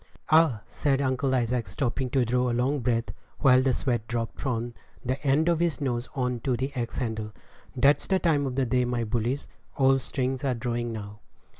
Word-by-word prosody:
"Ah," 155 Hz, -9 st, +4 dB
said 135 Hz, +3 st, 0 dB
Uncle 130 Hz, 0 st, +1 dB
Isaac, 120 Hz, -2 st, 0 dB
stopping 125 Hz, +6 st, -2 dB
to 130 Hz, -1 st, +2 dB
draw 125 Hz, +2 st, +1 dB
a -, -, 0 dB
long 135 Hz, +4 st, +1 dB
breath, 115 Hz, -1 st, 0 dB, 0.3 s
while 130 Hz, -3 st, +5 dB
the 130 Hz, 0 st, +2 dB
sweat 120 Hz, -3 st, -1 dB
dropped 115 Hz, -1 st, -3 dB
from 120 Hz, -3 st, -2 dB, 0.3 s
the 130 Hz, +2 st, -1 dB
end 145 Hz, +3 st, +3 dB
of 170 Hz, -2 st, +3 dB
his 170 Hz, -2 st, 0 dB
nose 125 Hz, -3 st, -2 dB
on 125 Hz, -2 st, -1 dB
to 125 Hz, -1 st, -1 dB
the 135 Hz, +3 st, -3 dB
axe 120 Hz, -2 st, -3 dB
handle, 110 Hz, -4 st, -3 dB, 0.4 s
"that's 140 Hz, +3 st, +3 dB
the 190 Hz, -, +3 dB
time 150 Hz, -6 st, +1 dB
of 125 Hz, -, -4 dB
day, 125 Hz, 0 st, +2 dB
my 120 Hz, -1 st, -1 dB
bullies; 120 Hz, +5 st, -2 dB, 0.3 s
all 135 Hz, 0 st, +4 dB
strings 130 Hz, 0 st, -2 dB
are 130 Hz, -3 st, +1 dB
drawing 120 Hz, 0 st, -2 dB
now." 105 Hz, -1 st, -7 dB
125 Hz, 190 wpm, -27 LUFS, 120-135 Hz, 0.4 s, while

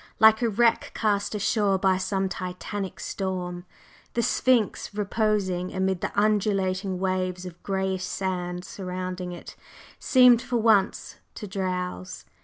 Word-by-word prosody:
Like 220 Hz, +1 st, +7 dB
a 235 Hz, -, +2 dB
wreck 230 Hz, +2 st, +2 dB
cast 210 Hz, -1 st, 0 dB
ashore 205 Hz, -1 st, +2 dB
by 190 Hz, -1 st, +2 dB
some 190 Hz, 0 st, -1 dB
titanic 190 Hz, +1 st, -5 dB
storm, 180 Hz, -2 st, -4 dB, 0.5 s
the 235 Hz, -, +1 dB
Sphinx, 230 Hz, -4 st, +1 dB
reposing 205 Hz, -3 st, 0 dB
amid 190 Hz, -1 st, 0 dB
the -, -, -2 dB
undulating 195 Hz, -2 st, +1 dB
waves 185 Hz, -1 st, -1 dB
of 175 Hz, -1 st, -10 dB
grayish 190 Hz, -1 st, -1 dB
sand 180 Hz, -2 st, -3 dB
surrounding 185 Hz, -1 st, -5 dB
it, 175 Hz, -, -9 dB, 0.4 s
seemed 250 Hz, -3 st, +6 dB
for 240 Hz, 0 st, -1 dB
once 215 Hz, -3 st, +2 dB, 0.2 s
to 215 Hz, -, -6 dB
drowse. 180 Hz, -, -4 dB
190 Hz, 125 wpm, -26 LUFS, 185-210 Hz, 0.5 s, Like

